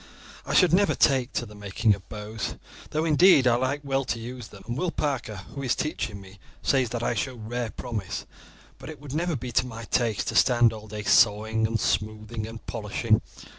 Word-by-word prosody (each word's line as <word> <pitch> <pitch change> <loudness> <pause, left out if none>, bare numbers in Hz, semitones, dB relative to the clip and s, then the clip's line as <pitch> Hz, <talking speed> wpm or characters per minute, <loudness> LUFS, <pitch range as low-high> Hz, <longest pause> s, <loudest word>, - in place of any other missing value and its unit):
I - - -1
should 180 -3 +5
never 200 +2 +4
take 130 -2 +3
to 120 - -1
the 105 - -12
making 105 +1 +1
of 95 -3 -9
bows, 105 0 -5 0.3
though, 155 +1 0
indeed, 160 -2 +6
I 120 - +5
like 130 +4 0
well 135 -1 0
to 120 - -2
use 120 0 -7
them; 100 - -14
and 120 +2 -3
Will 175 +6 0
Parker, 135 -9 -2 0.2
who 140 - -5
is 130 -3 +1
teaching 115 -9 -3
me 95 0 -14 0.2
says 130 -4 +2
that 120 0 -3
I - - +1
show 130 -2 -2
rare 120 +1 -4
promise; 105 -3 -5 0.5
but - - -9
it 155 - -9
would 140 -1 -9
never 170 +1 0
be 125 -1 -5
to 125 +1 +2
my 115 -1 -7
taste 115 -1 0
to - - -4
stand 120 -3 +5
all 110 -1 -9
day 105 0 -6
sawing, 110 +1 +4
and 115 0 -1
smoothing, 110 +1 -2
and 115 0 -10
polishing. 110 0 0
115 Hz, 210 wpm, -26 LUFS, 110-135 Hz, 0.5 s, indeed